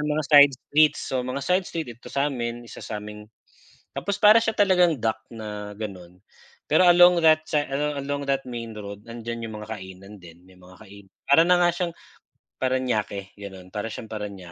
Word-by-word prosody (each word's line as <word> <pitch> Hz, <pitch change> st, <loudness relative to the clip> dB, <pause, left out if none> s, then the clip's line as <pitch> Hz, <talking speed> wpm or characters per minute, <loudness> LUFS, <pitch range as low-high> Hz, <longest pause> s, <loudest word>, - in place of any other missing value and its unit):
ng 150 Hz, -, -2 dB
mga 155 Hz, -, -1 dB
side 145 Hz, -1 st, +7 dB
street, 150 Hz, +3 st, +3 dB
so, 130 Hz, -1 st, -3 dB
mga 130 Hz, +2 st, -4 dB
side 180 Hz, +2 st, +1 dB
street 165 Hz, -4 st, -4 dB
dito 115 Hz, -, -14 dB
sa 140 Hz, +1 st, -1 dB
'min, 120 Hz, -1 st, -4 dB
isa 115 Hz, -, -11 dB
sa'ming 105 Hz, 0 st, -8 dB, 0.7 s
'tapos 200 Hz, -1 st, -3 dB
para 215 Hz, +2 st, +6 dB
siya 225 Hz, -1 st, -2 dB
talagang 180 Hz, -6 st, +3 dB
dock 110 Hz, -1 st, -2 dB
na 105 Hz, -2 st, -8 dB
gano'n, 90 Hz, -5 st, -8 dB, 0.5 s
pero 180 Hz, -, +4 dB
along 175 Hz, 0 st, +6 dB
that 155 Hz, -1 st, +4 dB
sa 150 Hz, -3 st, -1 dB
alo 145 Hz, +1 st, -2 dB
along 140 Hz, +1 st, -3 dB
that 135 Hz, -1 st, 0 dB
main 115 Hz, -2 st, -6 dB
road 100 Hz, -1 st, -9 dB
nandiyan 115 Hz, 0 st, -6 dB
'yung 110 Hz, -, -8 dB
mga 105 Hz, -, -10 dB
kainan 95 Hz, +1 st, -12 dB
din. 85 Hz, -2 st, -15 dB
May 90 Hz, -, -19 dB
mga 90 Hz, 0 st, -17 dB
kain 100 Hz, -1 st, -14 dB, 0.2 s
para 160 Hz, +4 st, +6 dB
na 180 Hz, 0 st, +4 dB
nga 175 Hz, -, +4 dB
siyang 175 Hz, 0 st, -3 dB, 0.7 s
Paranaque 120 Hz, -7 st, -2 dB
gano'n, 95 Hz, -2 st, -10 dB
para 105 Hz, +1 st, -4 dB
siyang 110 Hz, 0 st, -8 dB
Paranque 100 Hz, -5 st, -7 dB
120 Hz, 190 wpm, -24 LUFS, 105-150 Hz, 0.7 s, side